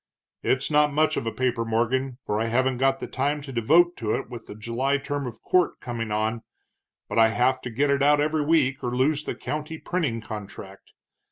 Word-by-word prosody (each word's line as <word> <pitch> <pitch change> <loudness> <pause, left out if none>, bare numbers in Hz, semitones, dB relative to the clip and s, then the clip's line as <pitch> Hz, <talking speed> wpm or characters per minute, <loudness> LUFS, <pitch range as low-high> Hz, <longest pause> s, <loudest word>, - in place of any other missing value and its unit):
It's 130 +3 0
not 150 0 +4
much 155 +2 +2
of 115 - -3
a - - 0
paper, 120 0 0
Morgan, 120 +3 0
for 105 +1 -1
I - - +1
haven't 130 +2 +1
got 135 0 +2
the - - -4
time 145 +3 -1
to 135 - -8
devote 165 +10 +4
to 110 -3 -1
it - - -5
with 120 - -8
the - - -8
July 120 +6 -1
term 140 -1 -4
of 115 -2 -9
court 180 -2 +2
coming 115 -3 -4
on, 110 +2 -1 0.7
but - - 0
I 115 - +7
have 130 +3 +1
to 125 - -5
get 140 +5 +1
it 140 0 +1
out 145 +1 +5
every 150 +1 +1
week 145 -4 +2
or 120 0 -2
lose 145 +3 +2
the - - -3
county 155 +1 -5
printing 155 -10 -2
contract. 100 -3 -9
130 Hz, 210 wpm, -25 LUFS, 115-145 Hz, 0.7 s, I